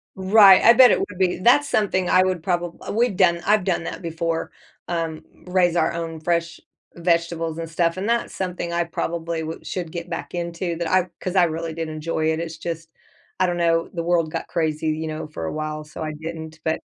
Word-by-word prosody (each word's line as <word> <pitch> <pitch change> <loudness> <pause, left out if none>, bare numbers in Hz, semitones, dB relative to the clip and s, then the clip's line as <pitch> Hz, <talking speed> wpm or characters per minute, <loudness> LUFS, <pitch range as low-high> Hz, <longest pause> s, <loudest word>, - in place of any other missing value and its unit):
Right, 190 0 +7
I 235 - +8
bet 250 +1 +8
it - - +3
would 185 -2 -5
be. 185 -1 +2
That's 265 +8 +4
something 190 -4 +1
I 185 - +5
would 185 -2 -1
probab 175 -1 -3
we've 235 -2 +2
done 175 -3 +3
I've 210 -1 +3
done 180 -2 0
that - - -6
before, 165 -1 -3 0.4
um, 165 -2 -3 0.2
raise 180 -1 +2
our 160 -2 +2
own 165 -1 -5
fresh 170 +1 -1 0.4
vegetables 170 -1 0
and 165 -1 -5
stuff, 165 +1 0
and 200 +4 -2
that's 235 0 0
something 180 -2 -3
I 170 0 +1
probably 170 -1 -3
wou 160 +1 -5
should 175 -4 -5
get 170 0 -6
back 140 0 -5
into 170 0 -3
that 170 -1 -2
I 185 0 +2
'cause 185 0 -3
I 185 - +6
really 165 0 -2
did 165 0 -4
enjoy 155 0 -1
it. 160 - -3
It's 165 -1 -5
just, 165 0 -5 0.5
I 185 - +4
don't 175 -1 -1
know, 165 -1 +1
the 170 - -2
world 170 -2 +1
got - - -4
crazy, 160 -2 -1
you 155 +1 -1
know, 155 0 -5
for 115 - -6
a - - -3
while, 155 0 -4
so 150 +2 -10
I 155 -1 -3
didn't, 160 0 -7
but 160 0 0
170 Hz, 215 wpm, -23 LUFS, 160-180 Hz, 0.5 s, I